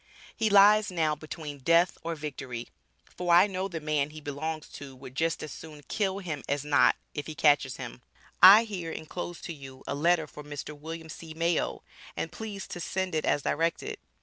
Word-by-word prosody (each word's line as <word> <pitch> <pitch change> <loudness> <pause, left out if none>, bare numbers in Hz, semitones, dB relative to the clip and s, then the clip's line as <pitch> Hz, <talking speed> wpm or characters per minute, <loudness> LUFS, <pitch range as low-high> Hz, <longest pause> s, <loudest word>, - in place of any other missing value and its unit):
He 220 -1 +1
lies 205 +1 +7
now 160 -4 +1
between 150 -1 -7
death 170 +6 +4
or 165 0 -2
victory, 130 -6 -6 0.5
for 180 -1 -1
I 175 - +8
know 190 -1 -2
the 170 -4 -5
man 150 -2 0
he 155 +1 -10
belongs 155 +2 -4
to 135 -2 -10
would 130 0 -11
just 165 +3 -1
as 155 - -6
soon 150 -2 -10
kill 195 -3 0
him 165 -7 -4
as 145 0 -1
not, 145 -1 +5 0.2
if 145 - -5
he 155 - -6
catches 145 -2 +3
him, - - -8 0.4
I 200 +5 +11
here 185 -7 -5
enclose 170 +2 -6
to 170 - -5
you 135 -3 -11
a - - -3
letter 160 +3 +2
for 150 0 -11
Mr. 145 +1 -7
Wm. 160 +2 -7
C. 160 0 -9
Mayo, 170 +1 0 0.3
and 165 - -3
please 210 -3 -6
to 175 - -6
send 190 +1 -2
it 155 - 0
as 145 - +1
directed. 170 - -1
160 Hz, 195 wpm, -29 LUFS, 145-180 Hz, 0.5 s, I